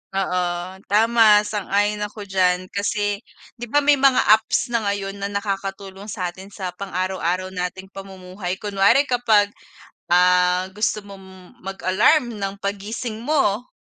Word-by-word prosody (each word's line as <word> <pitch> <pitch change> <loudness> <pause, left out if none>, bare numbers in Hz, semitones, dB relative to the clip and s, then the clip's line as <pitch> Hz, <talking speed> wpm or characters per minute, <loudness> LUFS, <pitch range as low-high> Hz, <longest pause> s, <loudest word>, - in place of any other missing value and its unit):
Oo, 180 -1 -2
tama 215 0 +5
sang-ayon 210 0 -1
ako 210 0 -5
diyan, 185 -2 0
kasi 205 0 -1 0.4
'di 240 - -6
ba 290 +5 +2
may 285 -1 +4
mga 270 -2 +4 0.2
apps 240 +2 -2
na 235 - +2
ngayon 200 0 -3
na 200 - -2
nakakatulong 195 -1 -5
sa'tin 185 -2 -5
sa 190 -3 -6
pang 190 0 -8
araw-araw 185 0 -1
nating 190 +1 -5
pamumuhay, 190 -1 -7
kunwari 205 +7 +3
kapag, 225 -6 +2 0.6
ah, 180 +1 +4
gusto 210 0 -1
mong 190 -2 -14
mag-alarm 200 - +1
ng 195 0 -3
paggising 210 +3 -5
mo. 245 -4 0
200 Hz, 130 wpm, -22 LUFS, 185-210 Hz, 0.6 s, tama